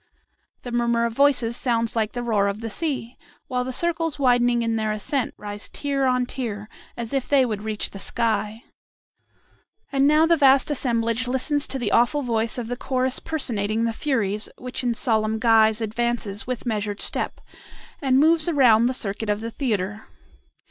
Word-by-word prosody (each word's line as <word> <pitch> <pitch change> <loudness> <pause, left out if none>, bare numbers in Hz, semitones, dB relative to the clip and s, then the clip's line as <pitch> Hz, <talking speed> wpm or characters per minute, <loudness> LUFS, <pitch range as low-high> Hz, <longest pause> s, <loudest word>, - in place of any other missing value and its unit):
The 245 - -6
murmur 235 -1 +1
of 230 - -2
voices 250 -3 +2
sounds 230 -3 0
like 220 -2 0
the 245 -1 -4
roar 210 -4 +1
of 200 +2 -3
the 225 -1 -5
sea, 260 -4 -3 0.3
while 250 -4 -2
the 260 - -4
circles 330 +2 -1
widening 245 -3 +3
in 230 0 0
their 215 -1 -1
ascent 230 +5 -2
rise 205 0 -7
tier 280 -2 -1
on 250 -1 +1
tier, 220 -5 -5 0.3
as 235 0 -5
if 270 -2 -1
they 275 -2 +4
would 215 -4 -3
reach 215 -1 -3
the 195 - -9
sky. 220 +1 -1 1.3
And 275 0 +3
now 305 +2 +5
the 335 +1 +4
vast 275 -1 +4
assemblage 235 -3 0
listens 280 +3 +1
to 270 - -2
the 240 -5 -2
awful 260 +5 +3
voice 230 -2 -1
of 240 -2 -4
the 245 +1 -4
chorus 255 0 -1
personating 230 -8 -1
the 230 - -1
Furies, 220 -6 -1
which 250 +1 -5
in 240 -2 0
solemn 220 -2 0
guise 220 -1 +4
advances 225 -1 -2
with 255 0 -4
measured 210 -3 -2
step, - - -2 0.6
and 265 -2 +2
moves 315 +3 +4
around 240 -7 +5
the 255 - -1
circuit 210 -1 -3
of 205 0 0
the 230 +1 -5
theatre. 215 -4 -3
235 Hz, 175 wpm, -23 LUFS, 220-265 Hz, 1.3 s, now